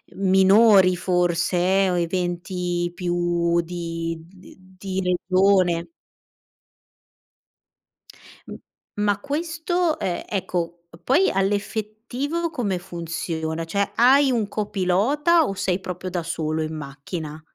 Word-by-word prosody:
minori 190 0 +5
forse 180 +2 +1
o 180 - 0
eventi 175 0 -2
più 175 -1 0
di 165 -1 -4
d 185 +1 -17 0.2
di 190 -1 -3
regione. 180 -1 +2 2.6
M - - -7 0.4
ma 205 -1 +1
questo, 325 +3 -1
ehm, 175 -2 -2
ecco, 170 -3 -3 0.2
poi 335 +9 +3
all'effettivo 220 - -2
come 210 - -2
funziona? 165 -1 -4
Cioè, 200 +4 -1
hai 265 +3 +5
un 225 -4 0
copilota 215 - +1
o 195 - -2
sei 190 -1 -1
proprio 185 0 -6
da 175 -2 -3
solo 160 -1 -2
in 155 0 -4
macchina? 150 +2 -7
185 Hz, 100 wpm, -23 LUFS, 170-205 Hz, 2.6 s, minori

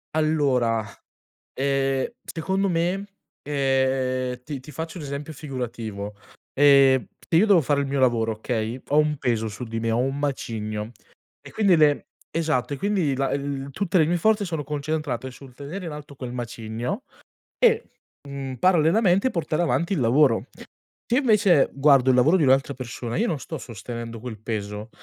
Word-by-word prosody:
Allora, 135 -8 +2 0.7
ehm, 135 0 0 0.2
secondo 190 +4 -1
me, 175 +4 0 0.4
ehm, 130 -3 0
ti 140 -2 -6
ti 150 - -12
faccio 160 +5 -6
un 155 - -7
esempio 145 +2 -5
figurativo: 115 -8 -5 0.4
ehm, 135 -3 +5 0.2
se 165 - 0
io 195 +6 +6
devo 200 -5 +6
fare 140 0 +1
il 140 - -2
mio 140 0 -1
lavoro, 115 -3 +2
okay, 110 +2 -3
ho 145 - +1
un 150 -1 +3
peso 115 -4 -1
su 115 +4 -7
di 115 0 -4
me, 115 - 0
ho 115 - +1
un 135 +3 0
macigno, 110 -6 -3 0.5
e - - -12
quindi 200 -5 +4
le 150 -2 +3 0.2
esatto, 155 -5 -1
e - - -4
quindi 185 -6 0
la 135 +1 0
l 140 -1 -3
tutte 190 +2 0
le 160 - +5
mie 175 +3 +1
forze, 215 +4 +2
sono 160 -6 -3
concentrate 145 -3 -3
sul 130 0 -14
tenere 155 +8 -7
in 165 - -5
alto 150 -1 -9
quel 125 -2 -6
macigno, 120 - -4 0.5
e, 470 -2 +4 0.5
mhmm, 135 -1 -5
parallelamente 185 +5 +3
portare 170 -1 -1
avanti 170 +2 0
il 180 - 0
lavoro. 125 0 +3 0.6
Se 235 - -1
io 280 - +4
invece 205 - +4
guardo 135 -2 +4
il 130 - +5
lavoro 145 +8 +5
di - - 0
un'altra 135 +1 +3
persona, 120 -2 -6
io 235 - +1
non 160 - -1
sto 160 +1 -6
sostenendo 115 +1 -7
quel 110 -3 -7
peso, 105 -1 -4
140 Hz, 170 wpm, -24 LUFS, 125-160 Hz, 0.7 s, io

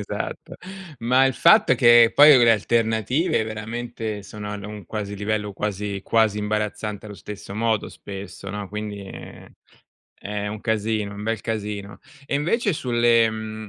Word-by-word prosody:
esatto, - - -6 0.4
ma 125 +3 +3
il 130 - 0
fatto 210 +6 +5
è - - +5
che 120 -2 +6
poi 145 -1 +8
le 120 -1 +6
alternative 115 - +1
veramente 110 0 -5
sono 105 +1 -7
ad 105 -1 -6
un 105 -3 -8
quasi 105 +1 -5
livello 105 0 -2
quasi 100 0 -3
quasi 110 -2 +2
imbarazzante 105 0 -3
allo 105 - -9
stesso 100 +3 -9
modo 110 0 0
spesso 100 0 -9
no, 100 0 -5
quindi, 105 0 -5
ehm, 95 - -11 0.7
è 105 0 -3
un 105 +1 -5
casino, 110 -2 -1
è - - -9
un 100 - -7
bel 115 -1 -1
casino. 105 -2 -5 0.3
E 140 - -2
invece 200 - 0
sulle, 120 -4 +3
mhmm, 110 -1 -6
110 Hz, 160 wpm, -23 LUFS, 105-115 Hz, 0.7 s, poi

